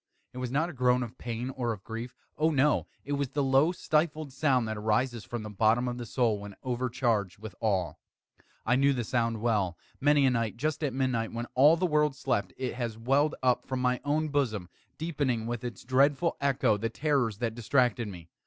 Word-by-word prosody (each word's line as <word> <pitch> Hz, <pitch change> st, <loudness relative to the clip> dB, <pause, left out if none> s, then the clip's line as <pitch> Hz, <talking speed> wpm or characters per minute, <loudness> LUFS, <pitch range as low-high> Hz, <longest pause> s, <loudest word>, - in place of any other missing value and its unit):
It 125 Hz, -, -7 dB
was 125 Hz, -1 st, -3 dB
not 145 Hz, +6 st, +1 dB
a 175 Hz, -, -7 dB
groan 125 Hz, -1 st, +2 dB
of 120 Hz, +1 st, -9 dB
pain 120 Hz, +2 st, -4 dB
or 125 Hz, -3 st, -2 dB
of 100 Hz, -3 st, -11 dB
grief 115 Hz, +2 st, -6 dB, 0.2 s
oh, 155 Hz, +2 st, +2 dB
no! 150 Hz, -1 st, +2 dB, 0.2 s
it 145 Hz, -, -6 dB
was 140 Hz, -2 st, 0 dB
the 145 Hz, +1 st, -1 dB
low 135 Hz, +5 st, +4 dB
stifled 155 Hz, -4 st, -1 dB
sound 130 Hz, -5 st, +2 dB
that 110 Hz, -, -3 dB
arises 110 Hz, +2 st, 0 dB
from 120 Hz, -2 st, -5 dB
the 105 Hz, -, -6 dB
bottom 110 Hz, +4 st, +2 dB
of 120 Hz, 0 st, -3 dB
the 120 Hz, -, -6 dB
soul 115 Hz, -5 st, +1 dB
when 100 Hz, -1 st, -9 dB
overcharged 120 Hz, -6 st, -1 dB
with 110 Hz, -1 st, -9 dB
awe. 95 Hz, -6 st, 0 dB, 0.7 s
I 125 Hz, +2 st, +3 dB
knew 140 Hz, +1 st, +4 dB
the 125 Hz, -2 st, -2 dB
sound 115 Hz, -1 st, -1 dB
well. 105 Hz, -7 st, +1 dB, 0.2 s
Many 145 Hz, 0 st, +4 dB
a 130 Hz, -, +4 dB
night, 115 Hz, -2 st, -1 dB
just 155 Hz, +4 st, -2 dB
at 145 Hz, -, +1 dB
midnight, 125 Hz, -3 st, -1 dB
when 120 Hz, +1 st, -3 dB
all 145 Hz, +6 st, +6 dB
the 185 Hz, -, +1 dB
world 150 Hz, -4 st, +2 dB
slept, 125 Hz, -7 st, -1 dB
it 130 Hz, -1 st, -3 dB
has 120 Hz, -3 st, -4 dB
welled 135 Hz, +6 st, +2 dB
up 125 Hz, -1 st, +2 dB
from 130 Hz, 0 st, -2 dB
my 125 Hz, 0 st, +1 dB
own 150 Hz, +2 st, 0 dB
bosom, 115 Hz, -11 st, -1 dB, 0.3 s
deepening, 140 Hz, -8 st, -1 dB
with 120 Hz, +1 st, -4 dB
its 120 Hz, -1 st, -6 dB
dreadful 140 Hz, +6 st, +2 dB
echo, 130 Hz, -6 st, +2 dB
the 115 Hz, +2 st, -2 dB
terrors 130 Hz, -5 st, 0 dB
that 115 Hz, 0 st, -2 dB
distracted 120 Hz, 0 st, +1 dB
me. 90 Hz, -4 st, -9 dB
125 Hz, 210 wpm, -29 LUFS, 115-140 Hz, 0.7 s, all